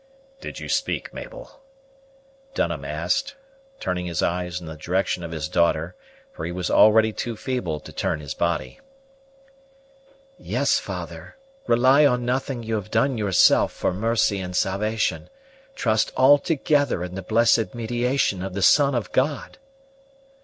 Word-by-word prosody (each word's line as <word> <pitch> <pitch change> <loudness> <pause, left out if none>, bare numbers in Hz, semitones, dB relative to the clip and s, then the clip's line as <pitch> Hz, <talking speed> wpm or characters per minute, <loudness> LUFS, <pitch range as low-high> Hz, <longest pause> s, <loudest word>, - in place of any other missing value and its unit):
"Did - - -8
you - - -7
speak, - - -2
Mabel?" - - -10 0.9
Dunham - - -1
asked, 280 +1 -2 0.4
turning 90 -1 -3
his 85 -2 -2
eyes 90 0 -2
in 85 - -11
the 80 -1 -7
direction 90 +3 -1
of 85 - -5
his 80 -2 -4
daughter, 85 +2 0 0.4
for - - -8
he - - -3
was 90 0 -3
already 110 0 +5
too 115 0 -4
feeble 105 - -3
to - - -11
turn - - -2
his 70 -2 -6
body. 85 - -2 1.6
"Yes, - - +1
father; - - -8 0.3
rely 130 +5 +5
on 125 -4 +2
nothing 125 0 -2
you 115 0 -4
have 105 -1 -3
done 115 +3 +1
yourself 95 -4 +4
for - - -1
mercy 110 0 +1
and 90 -1 -5
salvation; 105 +4 -1 0.5
trust 110 -3 +1
altogether 145 - +3
in 90 0 -6
the 95 - -5
blessed 115 +4 +2
mediation 120 -3 0
of 95 0 -5
the 100 - -1
Son 140 +2 +5
of 120 - -3
God!" 140 - -1
110 Hz, 145 wpm, -23 LUFS, 90-130 Hz, 1.6 s, already